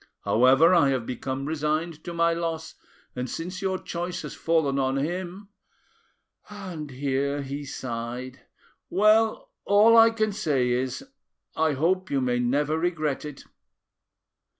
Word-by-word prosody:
However, 135 +9 +5
I 165 -6 +5
have 130 -4 -1
become 130 +2 -4
resigned 155 +1 -2
to 175 - -5
my 170 0 +2
loss, 165 -1 -4 0.4
and 125 0 -4
since 180 - -5
your 190 -1 -1
choice 175 0 -5
has - - -6
fallen 160 -4 +1
on 135 0 0
him,"—and 180 +6 -4 1.4
here 140 +1 -2
he 140 +2 -5
sighed,—"well, 135 - -1
all 210 +3 +5
I 225 0 +8
can 215 -1 -1
say 145 -12 0
is, 130 - -2 0.5
I 160 -1 +2
hope 185 +7 0
you 140 - +1
may 125 -1 0
never 145 +6 0
regret 155 -5 -1
it." 145 -2 -8
155 Hz, 125 wpm, -26 LUFS, 135-180 Hz, 1.4 s, I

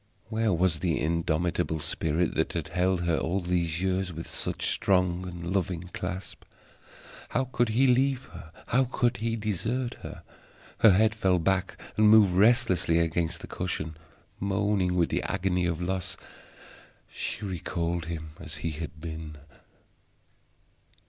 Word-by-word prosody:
Where 110 -1 +1
was 85 -2 +2
the 85 -1 0
indomitable 80 0 0
spirit 80 +3 -1
that - - 0
had - - -3
held 90 +1 +1
her 85 -2 +1
all 95 +4 0
these 85 -1 -1
years 95 -1 0
with 80 0 -7
such - - -2
strong 90 -1 +1
and 85 0 -5
loving 90 -2 -2
clasp? 90 +1 -5 0.9
How 130 - +1
could 120 -2 0
he 120 +5 +3
leave 130 +1 +3
her? 80 - -10 0.2
How 130 +2 +3
could 120 -1 0
he 115 0 -1
desert 110 +4 -2
her? - - -9 0.6
Her 110 - +8
head 110 +3 +4
fell 95 -4 +2
back 90 +2 0 0.2
and 105 0 +6
moved 105 -4 +7
restlessly 95 -5 +4
against 85 0 0
the - - -8
cushion; 80 -3 -3 0.4
moaning 100 -2 +1
with 85 -2 +2
the - - 0
agony 90 -1 0
of 85 -2 -2
loss, 90 +1 -2 0.9
she 105 - -3
recalled 85 -2 -2
him 80 -1 -5
as 80 -1 -6
he 80 - 0
had 75 0 -7
been. 80 -1 -6
90 Hz, 145 wpm, -28 LUFS, 85-105 Hz, 0.9 s, Her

